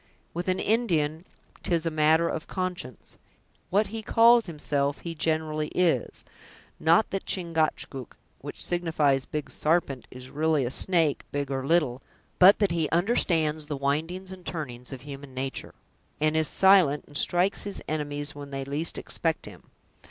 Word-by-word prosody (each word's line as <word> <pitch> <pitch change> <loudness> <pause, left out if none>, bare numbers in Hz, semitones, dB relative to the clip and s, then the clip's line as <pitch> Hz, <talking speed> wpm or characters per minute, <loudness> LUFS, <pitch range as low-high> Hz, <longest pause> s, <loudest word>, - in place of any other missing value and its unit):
With 175 +2 -4
an 185 0 +1
Indian 170 -9 0 0.4
'tis 170 -2 0
a 165 - 0
matter 155 +2 +3
of 160 - -4
conscience; 180 - -5 0.5
what 205 +4 +3
he 225 +1 -5
calls 230 +1 +5
himself, 145 -3 -2
he 170 - -5
generally 155 -1 -1
is—not 165 - 0
that 195 - -4
Chingachgook, 160 - -2 0.2
which - - -4
signifies 155 -6 +1
Big 150 -1 -4
Sarpent, 150 -5 0
is 125 0 -11
really 155 -2 +1
a 120 - -3
snake, 165 -2 +2
big 140 -1 -3
or 135 -1 -2
little; 140 -4 +1 0.4
but 190 +2 +8
that 205 -3 +1
he 165 -3 0
understands 165 -5 +1
the 150 -2 -3
windings 165 +7 -2
and 185 -1 -10
turnings 125 -8 -6
of 135 -2 -7
human 140 -1 -10
natur', 135 +1 -5 0.4
and 155 +1 +1
is 160 -1 +3
silent, 185 -7 +4
and 145 - -17
strikes 180 +7 +2
his 200 - -5
enemies 145 -1 -2
when 145 -1 -9
they 135 -1 -4
least 145 +4 -2
expect 165 -2 -2
him. - - -13
155 Hz, 150 wpm, -27 LUFS, 145-175 Hz, 0.5 s, but